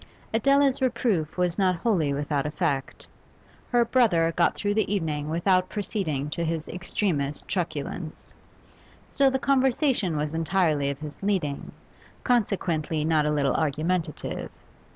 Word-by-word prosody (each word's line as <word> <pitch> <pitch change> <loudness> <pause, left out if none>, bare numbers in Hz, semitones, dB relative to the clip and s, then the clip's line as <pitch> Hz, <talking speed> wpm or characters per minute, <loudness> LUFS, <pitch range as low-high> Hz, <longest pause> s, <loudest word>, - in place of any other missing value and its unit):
Adela's 275 +3 +3
reproof 230 -12 0
was 180 +1 0
not 185 -2 +3
wholly 170 -6 +1
without 145 0 -1
effect; 150 -4 -2 0.6
her 240 -1 +3
brother 190 -10 +3
got 175 - +3
through 205 0 -1
the 210 -2 0
evening 155 -6 -1
without 185 +3 +2
proceeding 180 -9 -2
to 160 +3 -3
his 165 -1 -2
extremest 170 -6 -2
truculence, 160 -2 -4 0.8
still 275 -1 +4
the 265 - 0
conversation 260 - +2
was 150 +1 -2
entirely 160 -4 +1
of 140 - -3
his 150 0 -9
leading, 185 -8 -1 0.5
consequently 175 - 0
not 155 -2 +2
a - - +1
little 145 -2 +1
argumentative. 160 +2 -2
170 Hz, 130 wpm, -26 LUFS, 150-205 Hz, 0.8 s, still